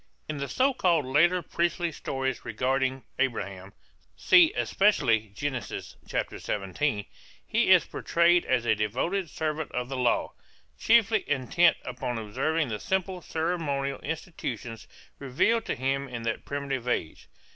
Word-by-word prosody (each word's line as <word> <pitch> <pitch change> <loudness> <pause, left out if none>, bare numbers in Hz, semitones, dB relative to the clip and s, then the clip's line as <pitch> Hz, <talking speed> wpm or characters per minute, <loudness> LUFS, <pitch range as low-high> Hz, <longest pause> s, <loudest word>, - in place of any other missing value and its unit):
In 155 - -4
the 140 - -3
so 265 - +2
called 170 - +2
later 170 +7 +3
priestly 170 0 -1
stories 135 -3 -3
regarding 130 +3 -1 0.2
Abraham 100 -7 -2 0.5
(see 345 -2 +6
especially 130 - +2
Gen. 135 0 -2
17) 105 +3 -3 0.4
he - - +1
is - - +7
portrayed 170 +1 +2
as 125 -2 0
a 110 - +4
devoted 130 - -1
servant 155 0 -3
of 125 0 -3
the 135 - -3
law, 125 -2 +1 0.5
chiefly 225 -2 +4
intent 145 +5 +3
upon 125 -1 -4
observing 130 +7 -1
the 105 -2 -3
simple 190 -1 -2
ceremonial 160 -5 -2
institutions 130 - -5 0.3
revealed 140 - +1
to - - -2
him 135 +2 -1
in 120 -2 -6
that 115 -1 -3
primitive 140 -3 -3
age. 80 -10 -2
140 Hz, 130 wpm, -27 LUFS, 120-170 Hz, 0.5 s, is